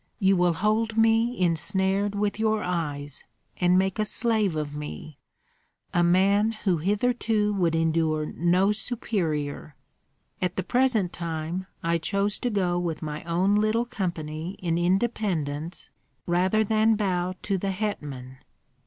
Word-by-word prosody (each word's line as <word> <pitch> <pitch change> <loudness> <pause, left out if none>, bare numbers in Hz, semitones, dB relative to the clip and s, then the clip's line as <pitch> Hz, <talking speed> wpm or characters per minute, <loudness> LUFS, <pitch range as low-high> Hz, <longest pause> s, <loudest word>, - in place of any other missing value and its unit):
You 195 -3 +3
will 175 -1 +3
hold 215 +5 0
me 225 +1 +3
ensnared 190 +4 +1
with 205 +1 -1
your 220 -1 +1
eyes, 145 -5 -3 0.3
and 180 0 +3
make 190 +2 +1
a - - +3
slave 215 -6 +1
of 150 -1 -3
me, 150 0 -7 0.7
a 175 - +3
man 200 +5 +3
who 195 -5 0
hitherto 210 +3 +1
would 175 -4 +1
endure 160 -1 +1
no 180 +6 +2
superior. 170 - -2 0.7
At 180 -1 -1
the 190 - -1
present 245 -8 +1
time 170 +2 -4 0.2
I 170 0 +1
chose 200 +4 -1
to 245 - -1
go 180 -5 0
with 170 -3 -3
my 150 0 -5
own 180 +4 +2
little 215 +3 +2
company 170 -5 -4
in 170 -2 -1
independence 175 -5 -1 0.3
rather 185 +5 +2
than 220 +1 +3
bow 185 -3 -1
to 195 -2 -1
the 195 - -2
hetman. 145 -11 -4
185 Hz, 135 wpm, -26 LUFS, 165-210 Hz, 0.7 s, You